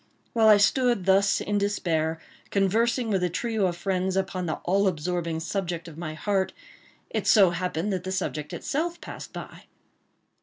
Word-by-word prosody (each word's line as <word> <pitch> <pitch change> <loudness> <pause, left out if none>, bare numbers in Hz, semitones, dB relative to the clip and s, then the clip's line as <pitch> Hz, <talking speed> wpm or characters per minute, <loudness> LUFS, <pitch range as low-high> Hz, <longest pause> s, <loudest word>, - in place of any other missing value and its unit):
While 225 -2 +4
I 210 -1 +8
stood 240 -1 +2
thus 195 +1 +4
in 205 0 -1
despair, 165 -6 0 0.3
conversing 225 +5 +1
with 190 -2 +1
a 180 - +2
trio 215 +2 0
of 175 -1 -3
friends 185 0 -1
upon 190 -2 -1
the 155 - -1
all 195 +2 +2
absorbing 170 -1 -1
subject 175 -1 -3
of 165 - -10
my 155 -1 -5
heart, 195 +3 0 0.6
it - - -2
so 195 -5 +6
happened 180 +2 -2
that 185 -2 -2
the 185 - -4
subject 155 -5 -3
itself 340 +4 -2
passed - - -9
by. - - -9
190 Hz, 165 wpm, -26 LUFS, 175-205 Hz, 0.6 s, I